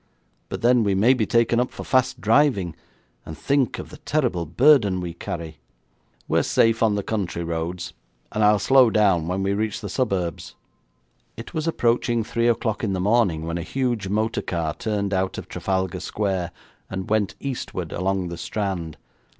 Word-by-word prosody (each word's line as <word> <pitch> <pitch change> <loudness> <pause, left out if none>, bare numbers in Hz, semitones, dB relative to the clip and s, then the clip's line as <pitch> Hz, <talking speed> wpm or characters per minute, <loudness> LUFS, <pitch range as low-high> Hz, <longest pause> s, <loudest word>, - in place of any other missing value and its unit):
'But - - -5
then 120 -1 +5
we 100 -2 +1
may 110 +7 +5
be 115 -5 0
taken 115 0 +3
up 125 - +1
for - - -8
fast 130 -1 +1
driving, 100 - +2 0.5
and 80 - -9
think 140 -2 +1
of - - -8
the - - -10
terrible 120 - -1
burden 110 - +4
we 90 -2 -4
carry.' 80 -2 -6 0.7
'We're - - +2
safe 115 0 +2
on 110 -2 +3
the 100 - -2
country 95 -6 -2
roads, 85 +2 -4 0.4
and 110 - 0
I'll 105 0 +5
slow 130 +4 +5
down 95 -7 +2
when 95 +2 -1
we 100 +1 +1
reach 105 +1 -1
the 105 - -6
suburbs.' 95 - -2 0.8
It 115 - -9
was 160 -1 -2
approaching 120 -5 +1
three 115 +1 0
o'clock 115 -2 0
in 105 -3 0
the 95 - -1
morning 95 -5 +2
when 85 +1 -3
a - - -3
huge 120 -1 -2
motor 110 +3 0
car 80 -3 -2
turned 100 -2 -2
out 95 0 -1
of - - -7
Trafalgar 95 -2 -2
Square, 95 -4 -2 0.4
and 95 -1 -5
went 105 -2 0
eastward 105 - -4
along 95 0 -1
the 85 -1 -7
Strand. 95 -7 -3
100 Hz, 175 wpm, -23 LUFS, 90-115 Hz, 0.8 s, then